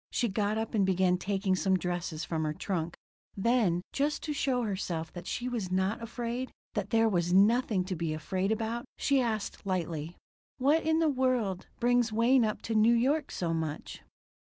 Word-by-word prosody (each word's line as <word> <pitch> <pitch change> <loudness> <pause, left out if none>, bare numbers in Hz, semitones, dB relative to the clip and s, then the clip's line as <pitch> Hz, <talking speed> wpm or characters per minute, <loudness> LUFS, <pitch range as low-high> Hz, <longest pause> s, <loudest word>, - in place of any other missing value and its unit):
She 240 - 0
got 205 +1 0
up 225 0 -3
and 210 -3 +3
began 185 -1 +2
taking 195 -1 0
some 190 0 +2
dresses 175 -2 -3
from 160 -2 -2
her 155 -1 -1
trunk. 170 -3 -3 0.4
Then, 195 -5 +2
just 290 +2 0
to 300 - -2
show 260 -3 0
herself 180 -6 -3
that 175 0 -8
she 245 - -3
was 225 -7 -3
not 190 +4 0
afraid, 240 +2 -4 0.2
that 205 -2 -2
there 225 -1 +4
was 175 -4 +1
nothing 205 -1 +4
to 185 0 -3
be 165 -1 -2
afraid 185 +6 -1
about, 225 +2 -2
she 275 -1 +2
asked 220 -4 -2
lightly: 170 -4 -3 0.4
"What 290 +5 +3
in 320 0 +2
the 325 -1 +3
world 255 -9 0
brings 240 -1 +3
Wayne 235 +3 +4
up 215 -1 -2
to 225 - -2
New 220 +2 +5
York 275 +6 +1
so 170 -2 -2
much?" 160 -2 -4
210 Hz, 185 wpm, -30 LUFS, 180-240 Hz, 0.4 s, New